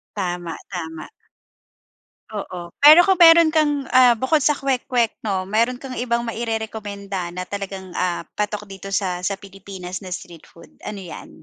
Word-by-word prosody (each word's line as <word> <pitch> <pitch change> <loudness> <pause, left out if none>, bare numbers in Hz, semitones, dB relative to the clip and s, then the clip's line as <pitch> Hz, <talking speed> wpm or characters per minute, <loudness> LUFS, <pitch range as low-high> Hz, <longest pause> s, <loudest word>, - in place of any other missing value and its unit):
Tama, 175 -2 -3
tama. 160 -1 -6 1.3
Oo, 180 -3 -6 0.2
pero 305 +3 +10
kung 380 -2 +4
meron 330 -1 +8
kang 295 -3 +1
ah, 250 -2 +7
bukod 305 +4 +2
sa 295 - +4
kwek-kwek, 250 -3 0
'no. 190 -2 -1
Meron 245 +2 +2
kang 265 -2 -7
ibang 235 -1 0
mairerekomenda 210 -5 -4
na 180 0 -4
talagang, 195 -2 -6
ah, 180 -2 -1 0.2
patok 210 0 -2
dito 195 +1 -8
sa 190 -1 +1 0.2
sa 200 - -1
Pilipinas 190 -1 -9
na 185 - -9
street 175 -4 -9
food, 170 - -16 0.2
ano 210 -2 -5
yan? - - -9
205 Hz, 150 wpm, -21 LUFS, 185-250 Hz, 1.3 s, pero